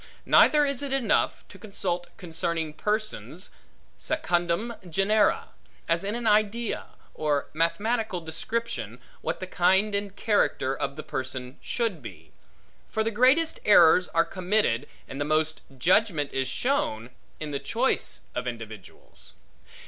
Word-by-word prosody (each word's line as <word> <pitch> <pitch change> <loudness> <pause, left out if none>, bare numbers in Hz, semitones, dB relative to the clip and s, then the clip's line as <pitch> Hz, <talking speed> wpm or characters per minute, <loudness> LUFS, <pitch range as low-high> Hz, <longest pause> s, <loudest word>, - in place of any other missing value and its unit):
Neither 300 -1 +6
is 280 -2 -1
it 280 -2 -4
enough, 270 -3 +1
to - - -13
consult 180 -5 -3
concerning 165 -2 -3
persons 215 +5 -3 0.5
secundum 180 - 0 0.2
genera, 200 +4 +2 0.4
as 165 +1 +1
in 205 +3 -2
an 240 0 -4
idea, 215 +2 +1 0.3
or 150 -2 -1
mathematical 205 +5 0
description, 160 - -4 0.2
what 160 - -2
the 185 - -4
kind 190 +3 +2
and 200 -1 -2
character 205 -12 +1
of 140 0 -3
the 155 - -7
person 130 0 -5
should 225 -10 -2
be; 80 -9 -11 0.6
for 220 - 0
the 225 - 0
greatest 260 +9 +3
errors 180 -3 +6
are 165 -1 +2
committed, 180 - 0 0.2
and 135 +2 -6
the - - +3
most 155 +1 0 0.2
judgment 175 - +2
is 135 -1 0
shown, 130 - -1 0.3
in 155 -1 -5
the 140 - -2
choice - - 0
of 125 0 -3
individuals. 110 -5 -8
180 Hz, 135 wpm, -27 LUFS, 145-220 Hz, 0.6 s, Neither